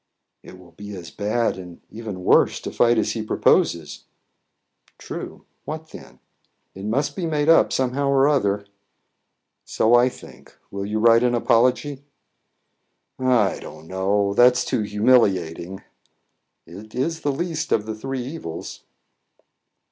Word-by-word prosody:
"It 90 - -13
will 90 -2 -17
be 105 +2 -9
as 90 -2 -9
bad, 110 0 -1
and 90 -2 -11
even 110 -4 -7
worse, - - +3
to - - -6
fight 120 0 +3
as 110 -1 +1
he 110 - -3
proposes." 85 -7 +1 0.9
"True. - - -8 0.2
What 160 +1 -7
then?" - - -13 0.6
"It 95 +1 -9
must 130 +7 -1
be 180 -3 -3
made 150 -1 0
up 165 - +5
somehow 130 +2 0
or 135 0 +4
other." 105 -8 +1 1.0
"So 115 - +1
I 120 +1 +5
think. - - -15
Will 100 0 -4
you 105 +1 -2
write 115 +1 +5
an 125 -1 +2
apology?" 125 +4 +1 1.2
"I 125 -7 +2
don't 80 +1 -11
know; 100 +2 0
that's 125 +3 +4
too 125 - -1
humiliating." 100 -5 +1 0.8
"It's 115 - -4
the 145 - -1
least 165 +2 -3
of 105 - +1
the 110 - -4
three 130 +3 -5
evils." 125 - -7
115 Hz, 135 wpm, -22 LUFS, 100-130 Hz, 1.2 s, up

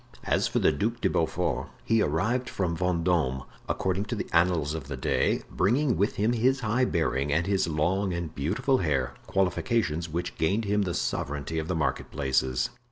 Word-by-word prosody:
As - - +1
for - - -2
the - - +4
Duc - - -1
de - - +1
Beaufort, - - 0 0.2
he 115 -1 +3
arrived 110 - 0
from 90 -3 -1
Vendome, 85 -7 +1 0.3
according 95 +2 0
to - - -3
the - - -3
annals 85 -3 +2
of 80 -4 -5
the 70 -1 -5
day, 65 - +1
bringing 125 +8 +2
with 100 +3 +1
him 110 +4 +1
his 130 +3 +2
high 120 +3 +2
bearing 75 - 0
and 80 +4 +2
his 95 -2 +1
long 90 +5 0
and 85 -2 -4
beautiful 95 - +1
hair, 70 -8 0
qualifications 90 -3 0
which 85 +3 -4
gained 100 +8 +1
him 105 +1 +1
the 90 -4 -1
sovereignty 75 +3 -2
of 80 - -4
the 90 - -1
marketplaces. 65 -5 0
85 Hz, 175 wpm, -27 LUFS, 75-100 Hz, 0.3 s, the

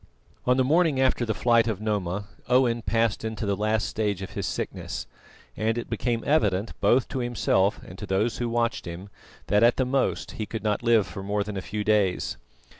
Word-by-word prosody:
On 125 +1 +4
the 130 - +4
morning 155 0 +3
after 130 -2 +2
the 110 - +1
flight 115 -1 +3
of 110 -4 -1
Noma, 100 -2 -2 0.2
Owen 125 -2 +3
passed 115 +1 0
into 110 0 -3
the 100 -1 +1
last 110 +2 0
stage 105 -3 -2
of 95 - -7
his 100 -1 -3
sickness, - - -4 0.5
and 110 +1 0
it 120 - -5
became 120 -3 -1
evident, 105 -8 +1
both 125 +1 +4
to 130 - -3
himself 115 -4 +1
and 90 - -11
to 105 - -6
those 105 +5 0
who 120 -1 -1
watched 115 0 0
him, 90 +4 -7 0.4
that 105 +1 +3
at 120 +1 +5
the 130 - +2
most 135 +1 0
he 110 - -5
could 110 - -5
not 105 -1 0
live 115 -3 +4
for 95 - -7
more 100 +1 -1
than 105 0 -6
a 95 - -3
few 105 +2 -4
days. 105 -4 +1
110 Hz, 205 wpm, -26 LUFS, 100-120 Hz, 0.5 s, at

